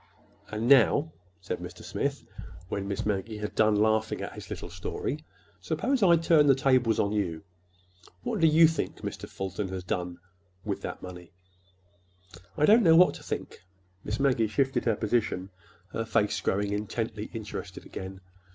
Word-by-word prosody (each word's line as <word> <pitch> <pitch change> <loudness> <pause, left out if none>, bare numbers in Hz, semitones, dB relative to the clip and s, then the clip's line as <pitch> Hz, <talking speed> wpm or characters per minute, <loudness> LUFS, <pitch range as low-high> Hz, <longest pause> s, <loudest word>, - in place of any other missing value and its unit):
'" - - -32
"And 110 +2 -2
now," 140 +4 +5 0.3
said 90 - -4
Mr. - - -9
Smith, - - -3 0.4
when 100 -1 -3
Miss 100 -1 -3
Maggie 105 +1 -2
had 105 0 -4
done 110 -1 +3
laughing 110 +1 +2
at - - -5
his - - -10
little - - -6
story, 150 +2 -4 0.4
"suppose 225 - -1
I 175 -4 +6
turn 160 -2 +4
the 135 - +6
tables 130 -4 +3
on 100 - +1
you? 95 -6 -2 0.8
What - - -2
do 165 - +5
you 160 +1 +7
think 160 - -3
Mr. - - -6
Fulton 95 +1 -4
has 95 -1 -5
done—with 90 +1 -6
that - - -6
money?" 90 -1 -10 1.2
"I 150 - +4
don't 220 +6 +7
know 165 -6 +6
what 180 +2 +6
to - - -10
think." - - -6 0.4
Miss 105 +2 -3
Maggie 130 -5 +3
shifted 135 +3 0
her 115 -3 +3
position, 105 -4 -1 0.4
her 115 - -1
face 105 -2 +1
growing 100 +1 0
intently 105 +1 -3
interested 105 -4 -7
again. 95 0 -8
110 Hz, 160 wpm, -28 LUFS, 95-135 Hz, 1.2 s, you